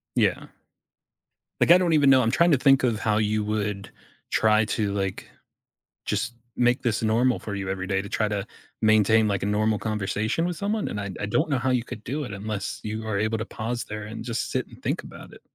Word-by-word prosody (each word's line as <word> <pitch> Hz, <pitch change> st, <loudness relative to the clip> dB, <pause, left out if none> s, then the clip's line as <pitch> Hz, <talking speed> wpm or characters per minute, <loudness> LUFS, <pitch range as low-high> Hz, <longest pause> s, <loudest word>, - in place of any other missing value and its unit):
Yeah. -, -, +1 dB, 1.2 s
Like, -, -, +5 dB
I 180 Hz, -, +10 dB
don't 175 Hz, -3 st, +1 dB
even 145 Hz, -3 st, +5 dB
know. 130 Hz, -1 st, +6 dB
I'm 115 Hz, 0 st, +1 dB
trying 170 Hz, 0 st, +4 dB
to 140 Hz, -, +5 dB
think 135 Hz, 0 st, +4 dB
of 115 Hz, -4 st, +1 dB
how 105 Hz, -1 st, +1 dB
you 110 Hz, 0 st, +1 dB
would 105 Hz, -2 st, -2 dB, 0.4 s
try 110 Hz, 0 st, +3 dB
to, 105 Hz, -1 st, -1 dB
like, 95 Hz, -2 st, -3 dB, 0.8 s
just 120 Hz, -, -1 dB, 0.2 s
make 125 Hz, +1 st, +2 dB
this 115 Hz, -3 st, 0 dB
normal 115 Hz, +3 st, +2 dB
for 105 Hz, -, -6 dB
you 100 Hz, -1 st, -4 dB
every 95 Hz, -1 st, -3 dB
day, 95 Hz, 0 st, 0 dB
to 100 Hz, -, -9 dB
try 110 Hz, -1 st, 0 dB
to 105 Hz, -1 st, -2 dB, 0.4 s
maintain, 110 Hz, 0 st, +4 dB
like, 100 Hz, -1 st, -1 dB
a -, -, 0 dB
normal 105 Hz, +1 st, +1 dB
conversation 110 Hz, -, -1 dB
with 175 Hz, -1 st, -2 dB
someone, 205 Hz, +1 st, -1 dB
and 105 Hz, -, -4 dB
I 100 Hz, -1 st, -4 dB
d 95 Hz, -, -8 dB
I 100 Hz, -, -2 dB
don't 155 Hz, +10 st, +1 dB
know 140 Hz, -3 st, +1 dB
how 130 Hz, -, 0 dB
you 125 Hz, -2 st, +1 dB
could 110 Hz, -2 st, -9 dB
do 145 Hz, +5 st, -3 dB
it 120 Hz, -, -6 dB
unless 100 Hz, 0 st, -4 dB
you 110 Hz, +1 st, -4 dB
are 100 Hz, -2 st, -1 dB
able 110 Hz, +1 st, 0 dB
to 110 Hz, -, -3 dB
pause 120 Hz, +2 st, -4 dB
there 105 Hz, 0 st, -6 dB
and 110 Hz, +2 st, -7 dB
just 115 Hz, -1 st, -3 dB
sit -, -, -1 dB
and -, -, -16 dB
think -, -, -2 dB
about -, -, -12 dB
it. -, -, -14 dB
110 Hz, 230 wpm, -25 LUFS, 105-125 Hz, 1.2 s, I